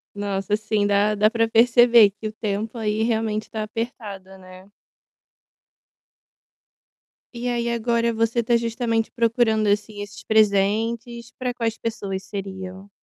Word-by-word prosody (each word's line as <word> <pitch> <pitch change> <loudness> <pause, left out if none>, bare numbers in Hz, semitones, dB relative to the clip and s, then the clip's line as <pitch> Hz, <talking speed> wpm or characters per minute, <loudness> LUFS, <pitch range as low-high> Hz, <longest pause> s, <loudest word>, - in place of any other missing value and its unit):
Nossa, 200 0 -3
assim, 215 -1 0
dá 205 +1 +2
dá 210 +1 +4
pra 230 0 +1
perceber 235 -1 +6
que 205 +2 -7
o 215 - -7
tempo 215 +2 -4
aí, 215 0 -1
realmente 220 -2 -1
tá 220 -1 -3
apertado, 210 -4 -6
né? 185 +1 -15 2.6
E 240 +1 -4
aí 235 -1 -1
agora 235 0 0
você 230 +1 0
tá 235 +1 +2
justamente 230 -1 -1
procurando, 230 -2 +1
assim, 205 0 -1
esses 205 +1 -10
presentes, 220 +3 +1
pra 250 -1 -2
quais 230 -2 -2
pessoas 200 -4 -4
seriam? 190 -1 -7
220 Hz, 130 wpm, -23 LUFS, 205-230 Hz, 2.6 s, perceber